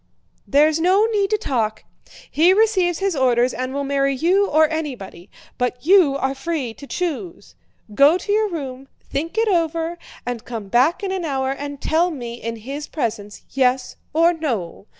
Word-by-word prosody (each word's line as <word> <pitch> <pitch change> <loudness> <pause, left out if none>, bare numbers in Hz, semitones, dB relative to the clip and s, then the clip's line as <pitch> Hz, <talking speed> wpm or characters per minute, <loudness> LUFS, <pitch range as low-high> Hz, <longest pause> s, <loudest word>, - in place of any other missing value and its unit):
"There's 300 +3 +3
no 375 +5 +4
need 415 -3 0
to 430 - +2
talk! 230 - -2 0.5
He 340 +5 +5
receives 385 -6 +2
his 390 -3 -1
orders 250 -2 +2
and 255 +2 -3
will 280 +1 -2
marry 275 0 +1
you 370 +8 +2
or 310 -1 +4
anybody; 255 - -6 0.3
but 250 +1 -2
you 345 -7 +5
are 270 0 -1
free 275 -4 -3
to 280 - -12
choose.... 350 +2 -4 0.4
Go 285 +9 +5
to 390 +3 -5
your 430 0 +2
room, 270 -6 -6 0.2
think 325 +8 -4
it 450 0 +2
over, 335 -2 0 0.3
and 245 -2 -4
come 225 -5 -7
back 270 - +2
in 390 - -2
an 380 -2 -2
hour 265 -4 -1
and 285 0 -6
tell 335 +5 +1
me 240 -7 -7
in 230 0 -4
his 275 +7 -7
presence: 210 -7 -4
yes 255 -1 +1 0.2
or 330 +3 +4
no. 230 - -4
290 Hz, 170 wpm, -21 LUFS, 255-345 Hz, 0.5 s, He